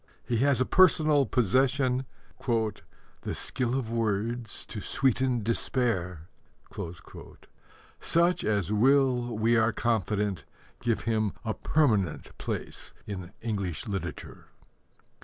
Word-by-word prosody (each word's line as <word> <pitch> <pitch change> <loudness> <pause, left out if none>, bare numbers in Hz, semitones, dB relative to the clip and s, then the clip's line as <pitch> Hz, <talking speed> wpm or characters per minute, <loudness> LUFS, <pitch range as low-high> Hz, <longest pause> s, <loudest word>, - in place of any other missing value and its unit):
He 120 - 0
has 140 +2 +3
a 130 - +3
personal 155 -6 +5
possession 130 +2 +2 0.4
The 110 -3 -3
skill 125 0 0
of 115 -4 -3
words 115 0 -2
to 105 - -7
sweeten 130 -2 +1
despair, 100 - -1 1.7
such 170 +2 +2
as 105 -3 0
will, 125 0 +3
we 115 +2 +3
are 110 0 +3
confident, 105 - -1 0.4
give 115 -2 0
him 110 -2 0
a 110 - 0
permanent 110 - 0
place - - -5
in 95 -3 -6
English 100 -8 -2
literature. 95 -4 -6
115 Hz, 100 wpm, -28 LUFS, 105-130 Hz, 1.7 s, personal